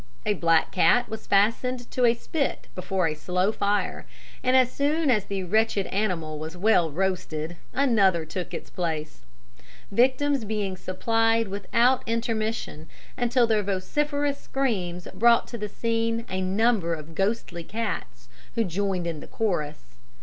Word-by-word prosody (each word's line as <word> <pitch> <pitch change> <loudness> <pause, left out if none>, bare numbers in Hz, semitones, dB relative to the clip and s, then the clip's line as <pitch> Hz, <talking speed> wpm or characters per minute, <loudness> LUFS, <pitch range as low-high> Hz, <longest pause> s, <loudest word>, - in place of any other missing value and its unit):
A - - +2
black 165 -1 +2
cat 240 +9 +3
was 220 - -7
fastened 235 +5 +1
to 250 - +2
a 235 0 +4
spit 280 +4 -2
before 185 0 -1
a 155 - -1
slow 180 +6 0
fire, 205 -1 -1 0.3
and 255 +1 +4
as 255 -1 +4
soon 295 +1 +1
as 210 -5 +2
the 195 -1 -3
wretched 210 +1 +1
animal 170 -7 -2
was 160 +3 -6
well 180 -4 +3
roasted, 170 -1 -2 0.2
another 200 - +3
took 175 +2 -5
its - - -7
place; 155 - -4 0.7
victims 260 +4 +2
being 205 -3 -2
supplied 225 +4 +1
without 230 +6 +2
intermission, 225 -8 -2 0.3
until 245 0 +2
their 220 -2 +2
vociferous 285 +9 -1
screams 185 -10 -2
brought 235 +4 +4
to 235 - -5
the 210 0 -3
scene 230 +1 -1
a 185 0 -1
number 190 -2 +1
of 155 +1 -10
ghostly 195 -2 -1
cats 185 - -5 0.3
who 230 - +2
joined 190 -1 -1
in 165 -3 -3
the - - -10
chorus. 150 - -3
205 Hz, 145 wpm, -26 LUFS, 180-230 Hz, 0.7 s, a